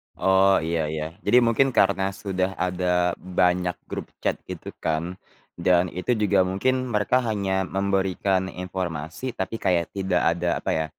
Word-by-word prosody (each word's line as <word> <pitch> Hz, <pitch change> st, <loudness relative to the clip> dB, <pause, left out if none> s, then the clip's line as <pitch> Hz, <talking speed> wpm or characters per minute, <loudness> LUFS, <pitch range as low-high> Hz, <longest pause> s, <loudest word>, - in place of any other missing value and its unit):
Oh, 95 Hz, 0 st, +4 dB
iya 80 Hz, -1 st, -1 dB
iya. 75 Hz, 0 st, -3 dB, 0.2 s
Jadi, 125 Hz, -, +5 dB
mungkin 115 Hz, +4 st, +3 dB
karena 95 Hz, -1 st, +2 dB
sudah 95 Hz, -3 st, -2 dB
ada 90 Hz, -1 st, +1 dB
banyak 90 Hz, -1 st, +1 dB
grup -, -, -5 dB, 0.2 s
chat -, -, 0 dB
gitu -, -, -7 dB
kan 85 Hz, +3 st, -2 dB, 0.4 s
dan 90 Hz, 0 st, +3 dB
itu 90 Hz, +8 st, -1 dB
juga 105 Hz, -4 st, +2 dB
mungkin 130 Hz, +8 st, 0 dB
mereka 110 Hz, +1 st, +1 dB
hanya 95 Hz, -3 st, 0 dB
memberikan 95 Hz, +1 st, 0 dB
informasi 90 Hz, -, -5 dB
tapi 95 Hz, +4 st, -3 dB
kayak 85 Hz, -5 st, +1 dB
tidak 95 Hz, -2 st, 0 dB, 0.2 s
ada 85 Hz, 0 st, -1 dB
apa -, -, -3 dB
ya, 80 Hz, 0 st, +1 dB
95 Hz, 145 wpm, -24 LUFS, 90-100 Hz, 0.4 s, Jadi